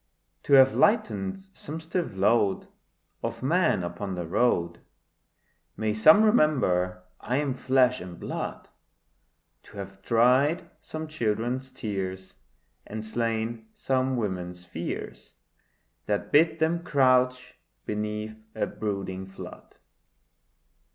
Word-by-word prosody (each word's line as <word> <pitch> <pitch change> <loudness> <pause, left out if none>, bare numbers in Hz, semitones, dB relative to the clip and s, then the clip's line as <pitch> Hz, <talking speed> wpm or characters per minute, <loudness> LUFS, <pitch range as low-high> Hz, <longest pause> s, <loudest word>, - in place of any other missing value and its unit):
To 140 - -1
have 135 -1 +8
lightened 195 -3 +1
some 155 +3 -7
stiff 165 - -3
load 100 0 +2 0.5
Of - - -4
men 165 - +2
upon 90 +3 -4
the 90 -1 -4
road— 85 -3 +1 1.0
May 110 0 0
some 155 - +7
remember 95 - +2 0.2
I 125 - -1
am 145 -2 0
flesh 130 -1 +2
and 90 -1 -9
blood! - - -5 0.9
To - - -15
have 100 0 -8
dried 125 - +3
some 160 0 -6
children's 120 -1 -2
tears, 95 -6 -5 0.5
And 110 +1 -6
slain 115 0 -2
some 130 -1 0
women's 90 -5 -4
fears 85 -1 -6 0.7
That 105 -1 -1
bid 160 +2 +4
them 165 +1 +1
crouch 125 -4 +2 0.3
beneath 105 +1 -4 0.2
a 110 - 0
brooding 95 -3 -4
flood. 95 - -11
115 Hz, 110 wpm, -27 LUFS, 95-140 Hz, 1.0 s, have